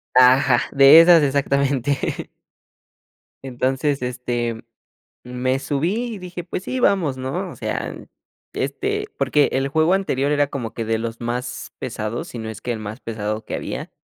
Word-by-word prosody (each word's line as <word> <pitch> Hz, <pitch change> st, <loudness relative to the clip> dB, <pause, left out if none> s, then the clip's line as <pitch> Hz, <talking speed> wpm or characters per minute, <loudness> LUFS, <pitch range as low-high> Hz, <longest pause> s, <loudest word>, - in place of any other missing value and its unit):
Ah, 125 Hz, 0 st, +8 dB
ja, -, -, +1 dB
de 140 Hz, +3 st, +9 dB
esas 165 Hz, 0 st, +7 dB
exactamente. 140 Hz, -1 st, 0 dB, 1.2 s
Entonces, 135 Hz, +2 st, -1 dB
este, 120 Hz, -2 st, -3 dB, 0.6 s
me 125 Hz, +1 st, -1 dB
subí 180 Hz, -, -1 dB
y -, -, -9 dB
dije: 180 Hz, -1 st, -7 dB
"Pues 180 Hz, +1 st, -5 dB
sí, 255 Hz, +5 st, -3 dB
vamos", 175 Hz, -, +2 dB
¿no?, 140 Hz, +9 st, -4 dB
o -, -, -10 dB
sea, -, -, -4 dB, 0.6 s
este 420 Hz, 0 st, -2 dB
porque 145 Hz, -1 st, +2 dB
el 135 Hz, +1 st, +1 dB
juego 160 Hz, +4 st, +3 dB
anterior 145 Hz, -8 st, 0 dB
era 145 Hz, -1 st, +2 dB
como 125 Hz, -5 st, -5 dB
que 115 Hz, -, -4 dB
de 110 Hz, 0 st, 0 dB
los 115 Hz, +1 st, -5 dB
más 120 Hz, +2 st, -4 dB
pesados, 110 Hz, +2 st, -4 dB
si 120 Hz, -, -7 dB
no 110 Hz, 0 st, -5 dB
es 110 Hz, -, -8 dB
que 125 Hz, -, -3 dB
el 115 Hz, -, -3 dB
más 110 Hz, +2 st, -7 dB
pesado 110 Hz, -1 st, -4 dB
que -, -, -4 dB
había, -, -, -5 dB
135 Hz, 160 wpm, -21 LUFS, 120-155 Hz, 1.2 s, de